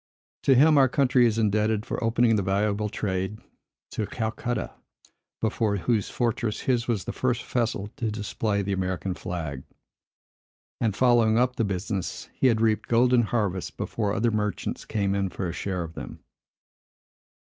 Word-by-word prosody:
To 135 - +4
him 150 +3 +6
our 135 -1 +5
country 130 -2 +4
is 110 -1 0
indebted 110 0 +1
for - - -3
opening 115 0 +3
the 105 - +2
valuable 100 +2 0
trade 95 0 -2 0.5
to 105 - -2
Calcutta; 115 +1 -3 0.7
before 110 -2 +1
whose 105 +1 0
fortress 115 -3 -1
his 120 -2 0
was 110 -6 0
the - - -5
first 125 -2 0
vessel 115 -5 -1
to 115 - -1
display 105 -1 -2
the 100 0 -1
American 95 -1 -2
flag; 80 -7 -5 1.2
and, 110 -4 0
following 120 -3 +4
up 125 +1 +2
the 115 - 0
business, 100 -1 -3
he 130 - +2
had 115 -3 +2
reaped 110 -1 +1
golden 125 +1 +4
harvests 105 -5 -1
before 105 -3 -3
other 115 +1 +2
merchants 105 -2 -2
came 100 -3 0
in 100 -1 0
for 90 - -4
a 85 - -4
share 90 -1 -3
of 80 0 -8
them. - - -9
110 Hz, 160 wpm, -26 LUFS, 100-120 Hz, 1.2 s, him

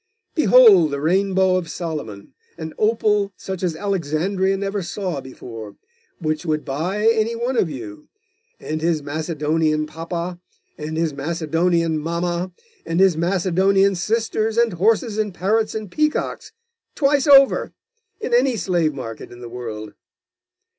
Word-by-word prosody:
Behold 235 - +6
the 140 -1 -3
Rainbow 190 +3 +2
of 170 -3 -4
Solomon, 150 - -6 0.2
an 160 -1 -6
opal 210 -2 +2
such 190 -2 -6
as 175 -4 -1
Alexandria 190 +1 0
never 200 +1 -2
saw 180 -4 -4
before, 115 -5 -9 0.4
which 155 -2 -2
would 155 -3 -1
buy 180 +10 -2
any 225 0 +2
one 240 +3 -2
of 190 -8 +2
you, 120 -2 -8 0.5
and 155 0 -4
his 160 -2 0
Macedonian 155 0 0
papa, 170 +3 -5 0.4
and 155 +1 -5
his 165 -2 0
Macedonian 165 +2 0
mamma, 170 +3 -2 0.3
and 165 +1 -2
his 190 -3 +5
Macedonian 190 +3 +2
sisters, 220 +3 -1
and 235 -3 +3
horses, 215 +4 +1
and 210 -4 -2
parrots, 215 +5 0
and 215 -4 -5
peacocks, 305 0 -1 0.4
twice 280 0 +2
over, 275 -1 +6 0.5
in 245 - -4
any 250 0 +3
slave 170 -6 0
market 115 -4 -7
in 120 - -12
the 120 - -8
world. 110 -3 -7
175 Hz, 135 wpm, -21 LUFS, 155-205 Hz, 0.5 s, Behold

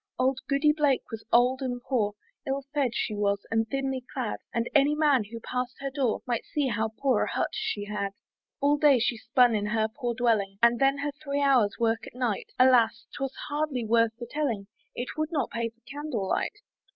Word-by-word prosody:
Auld 260 +1 +1
Goody 285 +2 +4
Blake 290 -4 +2
was 225 -1 -6
old 250 +3 +4
and 250 -2 -2
poor, 245 -5 0 0.3
Ill 275 +1 -1
fedd 270 -5 0
she 215 - -1
was, 200 -1 0
and 225 0 +1
thinly 270 0 -2
clad; 250 -5 -3
And 230 0 -1
any 290 0 +4
man 290 -7 +3
who 230 +3 -8
pass'd 250 +2 -3
her 275 0 -4
door, 260 -5 0
Might 240 -2 -1
see 290 -3 -1
how 220 -1 0
poor 260 -5 +2
a - - -5
hut - - 0
she 205 -1 -2
had. 200 -1 -3 0.5
All 290 +1 +3
day 290 -3 +5
she 240 0 +1
spun 240 +1 +3
in 210 -1 0
her 220 0 +1
poor 240 +1 -4
dwelling, 215 -5 +1
And 235 0 +5
then 275 +1 +3
her 290 +1 -2
three 285 0 -3
hours' 245 -8 +3
work 225 -1 0
at - - -12
night! 245 -5 -2
Alas! 235 -3 +4
'twas 270 -1 -3
hardly 290 -5 -1
worth 230 0 +3
the 240 - -6
telling, 235 -8 -2 0.3
It 245 - -4
would 310 +1 -1
not 285 -7 -1
pay 235 0 -2
for 235 +1 -32
candle 285 -9 -3
light. - - -1
250 Hz, 205 wpm, -27 LUFS, 225-275 Hz, 0.5 s, day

